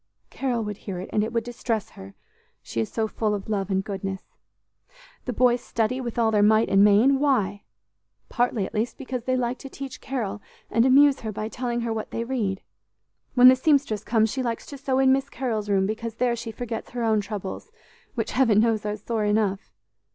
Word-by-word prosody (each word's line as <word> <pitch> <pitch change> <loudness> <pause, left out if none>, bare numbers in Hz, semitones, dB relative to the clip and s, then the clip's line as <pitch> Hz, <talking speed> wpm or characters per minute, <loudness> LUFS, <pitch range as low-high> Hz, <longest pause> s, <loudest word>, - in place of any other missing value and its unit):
Carol 245 -4 -1
would 210 -1 -5
hear 195 -4 -6
it, 185 - -8
and 210 - +2
it 220 - -3
would 230 -1 0
distress 230 -3 -3
her, 95 +1 -12 0.5
she 115 - -3
is 110 - -4
so 220 -1 -1
full 215 -1 -1
of 200 - -7
love 200 -3 -2
and 190 0 0
goodness. 195 -1 -5 1.0
The 250 - -2
boys 245 +1 +3
study 235 +2 -1
with 240 -2 -5
all 225 -2 +3
their 210 -1 +3
might 220 +2 +4
and 195 +1 +5
main. 220 +7 +5
Why? 210 -9 +1 0.7
Partly, 240 -4 0
at - - -9
least, 225 +3 -2
because 255 -3 -5
they 255 0 +1
like 245 0 -1
to 275 - -9
teach 270 -1 -8
Carol, 210 -6 -3 0.3
and 230 +3 +4
amuse 280 +1 +6
her 220 -2 -4
by 215 +1 -4
telling 240 0 -3
her 230 -1 -2
what 220 -1 -4
they 230 - -3
read. 225 -6 -2 0.7
When 250 0 +8
the 255 - +9
seamstress 260 -6 +1
comes, 220 -1 +2
she 265 - -2
likes 235 -2 -3
to 280 - -9
sew 265 -1 0
in 265 0 +5
Miss 270 +1 -1
Carol's 220 -7 -3
room, 195 -1 +3
because 225 +2 -4
there 240 0 +1
she 230 -1 -6
forgets 225 0 -5
her 240 -1 -4
own 220 -2 +2
troubles, 205 - -6 0.4
which, - - -2
Heaven 230 -6 +4
knows, 225 -1 +2
are 210 0 -2
sore 215 0 -2
enough! 205 -1 0
225 Hz, 210 wpm, -25 LUFS, 210-250 Hz, 1.0 s, the